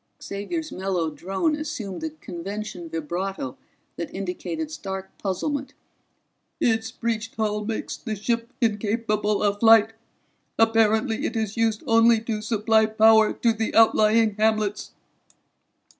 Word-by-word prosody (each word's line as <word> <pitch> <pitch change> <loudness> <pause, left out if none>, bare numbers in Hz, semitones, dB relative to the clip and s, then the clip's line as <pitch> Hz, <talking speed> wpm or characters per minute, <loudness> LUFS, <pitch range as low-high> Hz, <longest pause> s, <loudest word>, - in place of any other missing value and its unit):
Xavier's 310 +12 -5
mellow 185 -4 -2
drone 190 - -1
assumed 265 -11 -5
the 320 - -2
convention 195 - -7
vibrato 165 -2 -4 0.4
that 170 - -5
indicated 195 - -4
stark 190 -9 -6
puzzlement. 275 +8 -3 0.8
"Its 225 -1 +1
breached 225 -2 -3
hull 210 -1 -1
makes 220 +1 -4
the 220 -3 -5
ship 230 +3 -2
incapable 210 -1 0
of 205 0 +1
flight. 225 -1 +6 0.6
Apparently 225 +1 +2
it 235 - -6
is 220 -2 -2
used 225 -2 0
only 230 0 +5
to 220 -2 -3
supply 220 0 +2
power 220 0 +5
to 230 -1 +1
the 220 0 -3
outlying 220 0 +5
hamlets." 215 -1 0
220 Hz, 120 wpm, -24 LUFS, 200-230 Hz, 0.8 s, flight